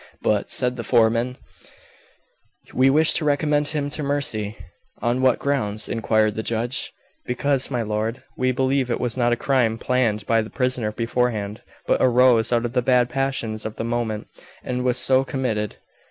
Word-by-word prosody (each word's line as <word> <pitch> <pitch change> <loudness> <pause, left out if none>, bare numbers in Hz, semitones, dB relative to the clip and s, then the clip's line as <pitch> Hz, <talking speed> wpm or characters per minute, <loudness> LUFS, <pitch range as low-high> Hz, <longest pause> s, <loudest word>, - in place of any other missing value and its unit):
"But," 105 -1 +1
said 125 -1 +2
the 120 - -4
foreman, 115 +2 +2 1.4
"we 130 +1 +4
wish 155 +3 +5
to - - 0
recommend 150 0 +1
him 145 -1 -2
to 155 - -2
mercy." 125 -7 -2 0.4
"On 120 +2 0
what 130 -2 +4
grounds?" 110 -7 -1
inquired 110 -2 +1
the 110 - -3
judge. 115 +3 -2 0.4
"Because, 135 +2 0
my 125 -3 -1
lord, 110 +4 -3
we 130 0 +1
believe 130 0 0
it 120 - -1
was 120 -2 -2
not 120 -2 +1
a - - +3
crime 120 -3 +1
planned 115 -4 0
by 115 +1 +2
the 110 - -7
prisoner 125 -4 -1
beforehand, 115 -2 -2 0.2
but - - +1
arose 125 -2 +4
out 120 0 +1
of 120 - -4
the 125 - +2
bad 125 0 +3
passions 125 -5 -2
of 110 0 -5
the - - -4
moment, 115 -2 -2 0.4
and 125 0 -3
was 125 -1 +1
so 130 0 +3
committed." 115 -6 -2
125 Hz, 170 wpm, -22 LUFS, 110-130 Hz, 1.4 s, wish